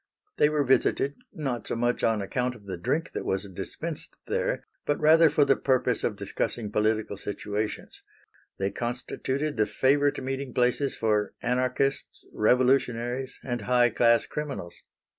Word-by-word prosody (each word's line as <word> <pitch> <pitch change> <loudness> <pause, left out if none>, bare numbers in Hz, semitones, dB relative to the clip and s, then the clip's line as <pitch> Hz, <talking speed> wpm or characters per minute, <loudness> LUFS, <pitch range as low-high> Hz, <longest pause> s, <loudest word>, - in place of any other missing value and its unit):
They 150 - +5
were 150 -1 +1
visited, 135 +1 +2 0.2
not 135 -6 -4
so - - -2
much 120 +1 0
on 110 -3 +2
account 125 +5 -1
of 105 -4 -16
the 95 - -4
drink 155 - -1
that - - -3
was 95 +1 -2
dispensed 95 - -6
there, - - -1 0.2
but 145 - 0
rather 160 +1 +6
for 145 0 +3
the 135 -1 +4
purpose 130 -1 +1
of - - 0
discussing 110 -4 -2
political 110 -1 0
situations; 105 +1 -4 0.6
they 95 +1 -1
constituted 130 +4 -3
the 110 - +2
favorite 145 +2 +2
meeting 135 -1 -4
places 125 +3 +1
for 105 -2 0
anarchists, 125 +2 0
revolutionaries, 125 +1 +1
and 120 -2 -3
high 120 +2 +3
class 115 +1 +4
criminals. 140 -13 -6
125 Hz, 145 wpm, -27 LUFS, 110-135 Hz, 0.6 s, rather